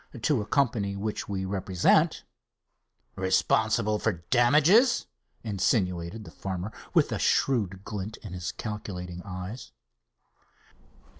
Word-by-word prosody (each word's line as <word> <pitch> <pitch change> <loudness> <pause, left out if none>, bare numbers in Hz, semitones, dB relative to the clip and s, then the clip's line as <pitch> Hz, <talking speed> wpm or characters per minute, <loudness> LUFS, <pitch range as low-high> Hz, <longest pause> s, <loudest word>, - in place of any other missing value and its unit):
"To 130 +1 +1
a 105 - -7
company 110 -8 +1
which 105 +1 -4
we 95 -1 -2
represent." 95 -2 +2 0.9
"Responsible 105 +3 +2
for 85 -4 -1
damages?" 155 - +5 0.4
insinuated 95 -2 0
the - - -11
farmer, 95 +1 -5 0.2
with - - +4
a - - -1
shrewd 100 -8 +1
glint 105 +1 -5
in 100 -5 -8
his 90 0 -4
calculating 90 -5 -6
eyes. 95 - -7
100 Hz, 105 wpm, -27 LUFS, 95-115 Hz, 0.9 s, damages